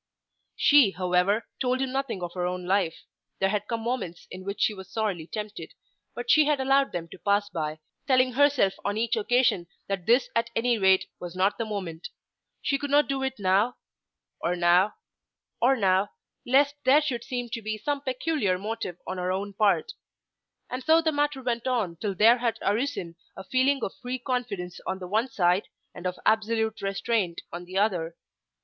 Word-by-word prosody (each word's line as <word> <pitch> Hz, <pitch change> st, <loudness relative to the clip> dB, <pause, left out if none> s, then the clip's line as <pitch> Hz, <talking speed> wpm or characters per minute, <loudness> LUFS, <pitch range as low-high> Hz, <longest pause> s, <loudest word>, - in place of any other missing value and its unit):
She, 280 Hz, -9 st, +5 dB
however, 180 Hz, +4 st, +1 dB
told 255 Hz, 0 st, +1 dB
him 265 Hz, -1 st, -1 dB
nothing 265 Hz, -8 st, -2 dB
of 175 Hz, -1 st, -5 dB
her 180 Hz, -1 st, -1 dB
own 180 Hz, 0 st, -4 dB
life. 185 Hz, -3 st, 0 dB, 0.3 s
There 195 Hz, -, +1 dB
had 210 Hz, 0 st, -2 dB
come 230 Hz, -1 st, -2 dB
moments 225 Hz, -8 st, -3 dB
in 185 Hz, 0 st, -8 dB
which 200 Hz, +2 st, -5 dB
she 215 Hz, -, +2 dB
was 190 Hz, -2 st, -10 dB
sorely 200 Hz, -8 st, -2 dB
tempted. 210 Hz, 0 st, -7 dB, 0.4 s
But 470 Hz, -, -1 dB
she 310 Hz, -1 st, +6 dB
had 295 Hz, -1 st, +2 dB
allowed 270 Hz, +1 st, +3 dB
them 170 Hz, -1 st, -4 dB
to -, -, -12 dB
pass 205 Hz, 0 st, +1 dB
by, 155 Hz, -4 st, -3 dB, 0.3 s
telling 255 Hz, -1 st, +4 dB
herself 280 Hz, -7 st, +3 dB
on 205 Hz, +1 st, -1 dB
each 230 Hz, +1 st, +1 dB
occasion 225 Hz, -5 st, +2 dB, 0.2 s
that 195 Hz, -3 st, -3 dB
this 245 Hz, +3 st, +4 dB
at 230 Hz, -, +1 dB
any 235 Hz, 0 st, +2 dB
rate 190 Hz, -1 st, +4 dB
was 175 Hz, 0 st, -7 dB
not 190 Hz, +4 st, +1 dB
the 230 Hz, -, -1 dB
moment. 185 Hz, -6 st, -5 dB, 0.5 s
She 275 Hz, -, +1 dB
could 285 Hz, 0 st, -4 dB
not 290 Hz, +1 st, +4 dB
do 275 Hz, -1 st, -1 dB
it 265 Hz, 0 st, -2 dB
now, 200 Hz, +5 st, +2 dB, 0.6 s
or 175 Hz, +1 st, 0 dB
now, 180 Hz, +4 st, +3 dB, 0.7 s
or 260 Hz, +3 st, +5 dB
now, 195 Hz, -3 st, +2 dB, 0.4 s
lest 280 Hz, +3 st, +4 dB
there 275 Hz, +4 st, +6 dB
should 255 Hz, -6 st, -2 dB
seem 245 Hz, -1 st, -4 dB
to 230 Hz, 0 st, -4 dB
be 215 Hz, 0 st, -3 dB
some 285 Hz, +5 st, -2 dB
peculiar 260 Hz, -, 0 dB
motive 200 Hz, -3 st, -4 dB
on 185 Hz, 0 st, -4 dB
her 180 Hz, 0 st, -1 dB
own 200 Hz, +2 st, -3 dB
part. 200 Hz, 0 st, +2 dB, 0.8 s
And 255 Hz, +1 st, -5 dB
so 325 Hz, +1 st, +5 dB
the 320 Hz, -, +2 dB
matter 290 Hz, -2 st, -1 dB
went 235 Hz, -1 st, -2 dB
on 215 Hz, -10 st, -1 dB
till 200 Hz, +2 st, -3 dB
there 230 Hz, +5 st, +6 dB
had 230 Hz, -2 st, 0 dB
arisen 205 Hz, -6 st, -1 dB, 0.2 s
a 190 Hz, -, -7 dB
feeling 260 Hz, +5 st, +1 dB
of -, -, -2 dB
free 250 Hz, +1 st, -3 dB
confidence 235 Hz, -9 st, -3 dB
on 190 Hz, -, -1 dB
the 185 Hz, -1 st, -7 dB
one 220 Hz, +6 st, +1 dB
side, 180 Hz, -4 st, +1 dB, 0.3 s
and 180 Hz, -, -5 dB
of 180 Hz, 0 st, -4 dB
absolute 220 Hz, 0 st, +1 dB
restraint 195 Hz, -2 st, -1 dB
on 175 Hz, +1 st, -6 dB
the 185 Hz, +2 st, -5 dB
other. 175 Hz, -5 st, 0 dB
215 Hz, 190 wpm, -27 LUFS, 185-255 Hz, 0.8 s, she